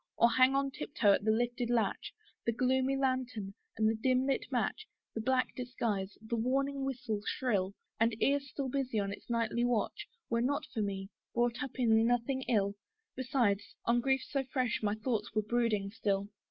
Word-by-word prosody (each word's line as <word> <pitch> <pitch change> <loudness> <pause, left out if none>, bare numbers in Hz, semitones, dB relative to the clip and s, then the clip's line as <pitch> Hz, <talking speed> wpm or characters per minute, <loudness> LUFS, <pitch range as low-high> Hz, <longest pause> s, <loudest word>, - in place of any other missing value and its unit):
Or 235 - +5
hang 260 +2 +5
on 275 0 +1
tiptoe 230 -7 +2
at - - +1
the - - +3
lifted 240 +2 +1
latch; 230 -5 0 0.4
The - - +4
gloomy 260 +3 +1
lantern, 255 -7 -1 0.2
and 220 -1 +3
the 220 - +3
dim 255 +3 +2
blue 275 -1 +2
match, 435 - -1 0.3
The 225 - -3
black 255 +2 +1
disguise, 225 -6 -2
the 230 +1 -2
warning 275 +4 0
whistle 245 -6 -2
shrill, 200 -6 0 0.2
And 225 0 +2
ear 285 +1 +3
still 275 0 -5
busy 260 -3 -1
on 200 -1 0
its - - -12
nightly 230 0 +1
watch, 240 -3 0 0.2
Were 230 0 +1
not 280 +4 0
for 220 - -1
me, 195 -1 -3 0.2
brought 240 +1 +1
up 275 -3 -4
in 225 -2 +4
nothing 245 +2 +1
ill; 200 -5 +2 0.4
Besides, 235 -6 0
on 240 +1 +3
griefs 265 +2 0
so 275 -2 +1
fresh 255 -3 -1
my 210 -1 +1
thoughts 215 -2 -2
were 215 - +2
brooding 215 -3 +1
still. 200 -2 -1
235 Hz, 180 wpm, -33 LUFS, 215-260 Hz, 0.4 s, Or